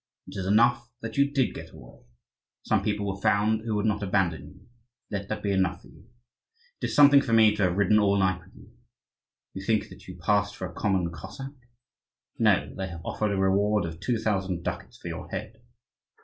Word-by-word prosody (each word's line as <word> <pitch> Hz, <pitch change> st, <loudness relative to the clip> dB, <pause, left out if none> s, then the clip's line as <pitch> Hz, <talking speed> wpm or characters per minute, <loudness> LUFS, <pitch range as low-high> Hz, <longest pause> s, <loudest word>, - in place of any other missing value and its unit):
It -, -, -11 dB
is 95 Hz, -1 st, -3 dB
enough 120 Hz, +3 st, +3 dB
that 115 Hz, -, -5 dB
you 140 Hz, 0 st, +4 dB
did 135 Hz, -3 st, 0 dB
get -, -, -9 dB
away. -, -, -14 dB, 0.6 s
Some -, -, +1 dB
people 105 Hz, -1 st, -1 dB
were 100 Hz, 0 st, -4 dB
found 110 Hz, +2 st, +2 dB
who 110 Hz, -1 st, -2 dB
would 105 Hz, +1 st, 0 dB
not 105 Hz, -1 st, 0 dB
abandon 95 Hz, -7 st, 0 dB
you; 95 Hz, +5 st, -17 dB, 0.5 s
let 100 Hz, -1 st, -3 dB
that 110 Hz, -, -4 dB
be 100 Hz, -, 0 dB
enough 95 Hz, -2 st, 0 dB
for -, -, -16 dB
you. 110 Hz, -, -19 dB, 0.7 s
It -, -, -1 dB
is -, -, -3 dB
something 140 Hz, -1 st, +8 dB
for 120 Hz, -4 st, -2 dB
me 110 Hz, -2 st, +6 dB
to 105 Hz, -, -3 dB
have 90 Hz, +1 st, 0 dB
ridden 105 Hz, +1 st, +4 dB
all 100 Hz, -1 st, +3 dB
night 95 Hz, -1 st, +1 dB
with 95 Hz, -, -21 dB
you. 110 Hz, -, -16 dB, 0.8 s
You 95 Hz, -, -7 dB
think 110 Hz, +1 st, 0 dB
that -, -, -14 dB
you 90 Hz, -1 st, -9 dB
passed 100 Hz, +4 st, +1 dB
for 95 Hz, -, -5 dB
a 85 Hz, -, -12 dB
common 95 Hz, -4 st, 0 dB
Cossack? 135 Hz, -, -8 dB, 0.9 s
No, -, -, +2 dB
they 95 Hz, 0 st, -3 dB
have 85 Hz, -2 st, -9 dB
offered 110 Hz, -, -1 dB
a 100 Hz, -, -1 dB
reward 100 Hz, +1 st, +2 dB
of 80 Hz, 0 st, -7 dB
two 120 Hz, +4 st, 0 dB
thousand 95 Hz, -5 st, -1 dB
ducats -, -, -5 dB
for -, -, -9 dB
your -, -, -7 dB
head." -, -, -6 dB
100 Hz, 210 wpm, -27 LUFS, 95-110 Hz, 0.9 s, something